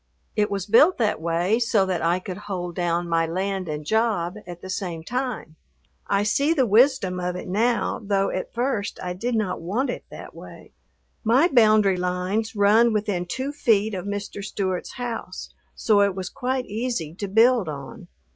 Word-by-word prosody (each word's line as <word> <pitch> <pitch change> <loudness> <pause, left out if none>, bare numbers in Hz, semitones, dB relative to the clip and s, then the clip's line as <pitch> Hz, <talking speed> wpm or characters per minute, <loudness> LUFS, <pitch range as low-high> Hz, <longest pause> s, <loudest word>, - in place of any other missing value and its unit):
It 210 0 +1
was 195 -2 -3
built 260 - +5
that 215 -8 0
way 170 +7 +1
so 225 -4 +2
that 185 -3 -1
I 170 +2 +2
could 185 0 -6
"hold 180 -2 -3
down" 175 0 -1
my 165 -1 +1
land 190 +1 -2
and 150 0 -4
job 215 -4 0
at 175 -1 -9
the - - -6
same 175 -4 -4
time. 245 -9 -4 0.5
I 200 0 +2
see 280 +9 +2
the 265 -4 +3
wisdom 220 -4 +3
of 180 0 -2
it 180 - -6
now, 230 +7 0
though 195 -1 +1
at 185 - -4
first 235 -4 -2
I 180 -1 -3
did 235 +7 -2
not 200 -6 -1
want 210 +11 -1
it - - -7
that - - -10
way. - - -12 0.5
My 255 +10 +4
boundary 215 - +4
lines 180 +5 -2
run 215 +3 +4
within 205 -4 -1
two 260 +9 -3
feet 220 -7 +2
of 185 -1 -4
Mr. 200 0 -5
Stewart's 190 -3 -3
house, 235 -7 -6 0.2
so 210 -3 +3
it 200 -2 +2
was 185 -2 -4
quite 255 0 -2
easy 215 -8 -3
to 200 - -2
build 225 -1 +4
on. 140 -3 -8
200 Hz, 180 wpm, -24 LUFS, 180-230 Hz, 0.5 s, built